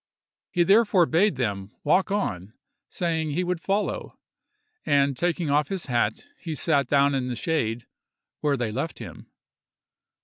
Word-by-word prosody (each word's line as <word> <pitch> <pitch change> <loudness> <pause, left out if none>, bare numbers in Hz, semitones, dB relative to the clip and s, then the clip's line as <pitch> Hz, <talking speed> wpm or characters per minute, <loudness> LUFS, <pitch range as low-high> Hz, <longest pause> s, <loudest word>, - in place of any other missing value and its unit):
He 175 - +2
therefore 195 -1 +4
bade 190 +6 +2
them 100 -5 -3
walk 180 +6 +3
on, 105 - -2 0.4
saying 165 -3 -1
he 180 +5 0
would 180 -1 -2
follow; 200 +3 -2 0.7
and 140 -1 +2
taking 170 0 -1
off 150 +1 +2
his 195 -3 -4
hat, 120 - -1
he 160 -3 -5
sat 140 -1 +1
down 140 0 +3
in 130 -2 -1
the 125 - -3
shade, 120 -5 -1 0.5
where 145 -2 +1
they 120 -3 -2
left 135 +8 -3
him. - - -10
150 Hz, 145 wpm, -25 LUFS, 125-175 Hz, 0.7 s, therefore